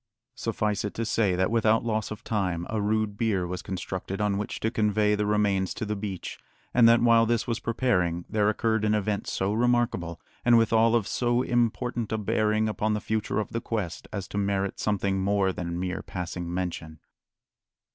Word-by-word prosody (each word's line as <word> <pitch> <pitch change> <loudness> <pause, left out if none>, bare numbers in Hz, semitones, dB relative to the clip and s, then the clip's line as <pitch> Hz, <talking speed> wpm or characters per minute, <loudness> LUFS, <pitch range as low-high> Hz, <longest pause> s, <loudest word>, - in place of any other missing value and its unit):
Suffice 105 -4 -1
it 105 - -4
to 115 - -2
say 105 -4 +1
that 95 +3 +1
without 115 0 +3
loss 110 -1 -1
of 110 - -7
time 90 -6 -1
a 110 -1 0
rude 105 0 0
bier 100 -6 +1
was 90 +1 -4
constructed 95 +1 -5
on 105 -1 +1
which 105 - -4
to 110 - 0
convey 105 -2 +2
the 105 0 0
remains 100 -3 +1
to - - -3
the 105 0 -2
beach, 100 -3 -5 0.3
and 120 -2 +6
that 115 0 +5
while 115 -1 +5
this 115 -1 +1
was 115 -2 -2
preparing 90 -8 0
there 105 -1 +2
occurred 110 0 0
an 105 0 +2
event 105 -1 -1
so 95 +2 -1
remarkable, 115 -8 +1 0.2
and 120 -1 +6
withal 115 0 +4
of 110 -4 +1
so 120 +1 +1
important 120 -1 0
a 110 - 0
bearing 110 +1 +1
upon 110 0 0
the - - -1
future 110 -1 -2
of 105 - -3
the 115 - -2
quest, 105 -8 -4
as 100 -2 -4
to 100 - -2
merit 100 -1 -1
something 100 -2 0
more 100 -1 +1
than 85 -1 -4
mere 90 0 -2
passing 90 -1 -5
mention. 85 -3 -4
105 Hz, 190 wpm, -27 LUFS, 95-115 Hz, 0.3 s, and